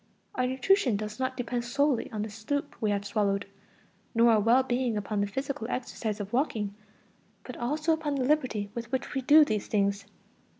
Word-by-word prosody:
Our 255 0 0
nutrition 260 - +2
does 210 +2 -6
not 260 0 -2
depend 245 -1 -2
solely 275 +1 0
on 210 -1 -3
the 215 - -5
soup 230 +7 -3
we 215 - +1
have 200 0 -1
swallowed, 200 -1 0 0.7
nor 230 +1 +6
our 220 - +5
well 235 +5 +4
being 245 -3 0
upon 205 0 -2
the 205 - +1
physical 265 +2 -4
exercise 225 -4 -3
of 205 +1 -6
walking, 225 -6 0 0.7
but 250 - -8
also 305 +6 0
upon 310 -2 -2
the 260 -2 0
liberty 255 -8 0
with 235 0 -6
which 260 +2 -2
we 270 - -1
do 300 +4 +7
these 215 -6 -2
things. 200 -1 0
240 Hz, 185 wpm, -28 LUFS, 210-265 Hz, 0.7 s, do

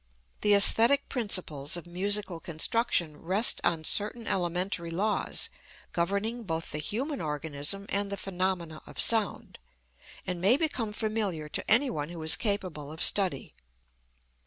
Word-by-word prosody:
The 210 - +3
æsthetic 230 +7 +6
principles 175 - +2
of 175 - -9
musical 190 0 -1
construction 170 -1 -1
rest 190 +9 +3
on 165 -2 0
certain 215 +7 +1
elementary 175 -1 -2
laws 200 +6 0 0.4
governing 200 +7 -2
both 165 -6 -5
the 150 - -4
human 250 - -4
organism 150 +4 -4
and 200 0 -2
the 200 - -4
phenomena 180 -4 -3
of - - -11
sound, 220 -4 +1 0.7
and 180 -2 -4
may 210 +8 +4
become 260 -9 -2
familiar 210 -8 -3
to - - -4
any 255 +5 +4
one 150 -1 -4
who 170 -2 -8
is 155 - +6
capable 185 - -3
of 160 - 0
study. 185 -9 +2
190 Hz, 135 wpm, -28 LUFS, 165-210 Hz, 0.7 s, æsthetic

